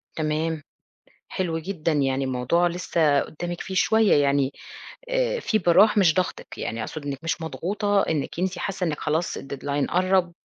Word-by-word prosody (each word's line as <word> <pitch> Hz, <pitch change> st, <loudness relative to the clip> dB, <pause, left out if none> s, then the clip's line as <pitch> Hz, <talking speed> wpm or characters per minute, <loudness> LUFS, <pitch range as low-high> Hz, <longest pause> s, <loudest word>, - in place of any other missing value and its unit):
تمام، 155 Hz, 0 st, -1 dB, 0.6 s
حلو 170 Hz, -3 st, -2 dB
جدًا، 165 Hz, -1 st, -2 dB
يعني 135 Hz, -2 st, +1 dB
الموضوع 130 Hz, +7 st, +1 dB
لِسّه 165 Hz, -4 st, +1 dB
قدامِك 175 Hz, +2 st, -5 dB
فيه 190 Hz, -3 st, -6 dB
شوية 220 Hz, +2 st, +4 dB
يعني 140 Hz, -1 st, +1 dB, 0.6 s
آآ -, -, 0 dB
فيه 215 Hz, -, +1 dB
براح 195 Hz, +4 st, +5 dB
مش 175 Hz, -5 st, +5 dB
ضغطِك، 185 Hz, -1 st, -3 dB
يعني 115 Hz, 0 st, -3 dB
أقصد 155 Hz, +6 st, -6 dB
إنِك 140 Hz, -2 st, -3 dB
مش 165 Hz, 0 st, -2 dB
مضغوطة 200 Hz, +5 st, 0 dB
إنِك 155 Hz, 0 st, -2 dB
أنتِ 185 Hz, +1 st, -1 dB
حاسة 195 Hz, -2 st, -2 dB
إنِك 150 Hz, -2 st, -2 dB
خلاص 160 Hz, +3 st, -1 dB
الDeadline 140 Hz, +1 st, -3 dB
قرّب 185 Hz, 0 st, +2 dB
165 Hz, 155 wpm, -24 LUFS, 145-185 Hz, 0.6 s, براح